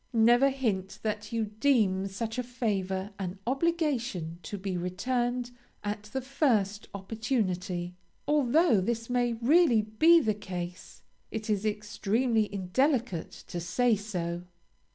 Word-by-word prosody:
Never 240 +4 +5
hint 215 -9 -2
that 210 -1 -3
you 225 -1 0
deem 210 -4 +2
such 225 +4 -4
a - - +2
favor 205 -6 -2
an 185 0 -4
obligation 260 - -1
to 205 +5 -6
be 190 -1 -3
returned 240 +7 -1 0.3
at 205 0 -3
the 265 +5 -4
first 225 -7 +1
opportunity; 190 -4 -2 0.3
although 295 - +4
this 230 +4 -2
may 245 -1 +2
really 245 0 +4
be 315 +11 +5
the 220 -8 +1
case, 180 -3 -7 0.3
it 220 0 -3
is 210 +1 0
extremely 215 +2 0
indelicate 210 - 0
to 175 - -5
say 235 +7 +2
so. 175 -5 -3
220 Hz, 125 wpm, -29 LUFS, 195-245 Hz, 0.3 s, Never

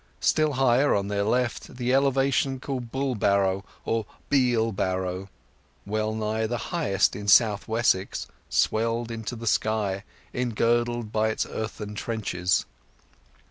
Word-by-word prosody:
Still 155 -1 +2
higher, 135 +1 +3
on 100 0 -1
their 100 0 0
left, 120 +4 -1
the 125 0 0
elevation 135 0 +2
called 125 -3 -5
Bulbarrow, 100 -8 +1 0.2
or 115 -2 -1 0.2
Bealbarrow, 95 -8 +1 0.6
well 110 +1 -1
nigh 110 0 -1
the 120 +2 -2 0.2
highest 150 - +2
in 105 0 -6
South 105 0 +5
Wessex, 110 -4 +1 0.2
swelled 115 +1 +1
into 115 +1 -5
the 115 0 -7
sky, 105 -3 0 0.3
engirdled 120 -1 0
by 110 0 +2
its 110 - -1
earthen 105 -1 -5
trenches. 100 -5 -1
110 Hz, 120 wpm, -26 LUFS, 105-125 Hz, 0.6 s, South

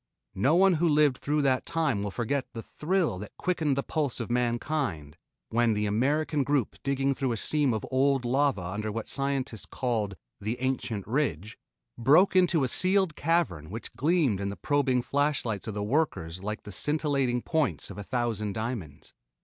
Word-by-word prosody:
No 135 - +2
one 190 +1 +5
who 170 - +4
lived 150 -3 +3
through 150 +1 0
that 130 -2 +2
time 155 -11 0
will 100 - -2
forget 125 +6 -2
the 115 - -6
thrill 160 - -1
that 105 - -10
quickened 155 -6 0
the 140 - 0
pulse 150 -6 -2
of 115 -1 -4
mankind 120 - -1 0.3
when 115 -1 +2
the 105 0 0
American 140 +8 +1
group 140 -4 0
digging 140 0 +1
through 135 -2 -1
a - - -3
seam 145 +4 +1
of 110 -2 -2
old 135 0 +2
lava 135 -5 +1
under 105 +4 -3
what 110 +1 -4
scientists 135 -5 -2
call 115 -5 -1 0.3
the 110 +4 -3
"ancient 125 -6 -2
ridge," 110 - -1 0.4
broke 150 +12 +5
into 175 -5 +4
a - - +2
sealed 185 +3 +3
cavern 155 - 0
which 110 +4 -6
gleamed 145 - +1
in 100 - -2
the 100 - -4
probing 130 - +1
flashlights 140 -8 -1
of 110 - -4
the 105 - -2
workers 105 - -1
like 105 +2 -4
the 105 - -9
scintillating 140 -2 0
points 160 -6 -1
of - - -8
a - - -5
thousand 110 -3 -2
diamonds. 110 - -5
130 Hz, 175 wpm, -28 LUFS, 110-150 Hz, 0.4 s, one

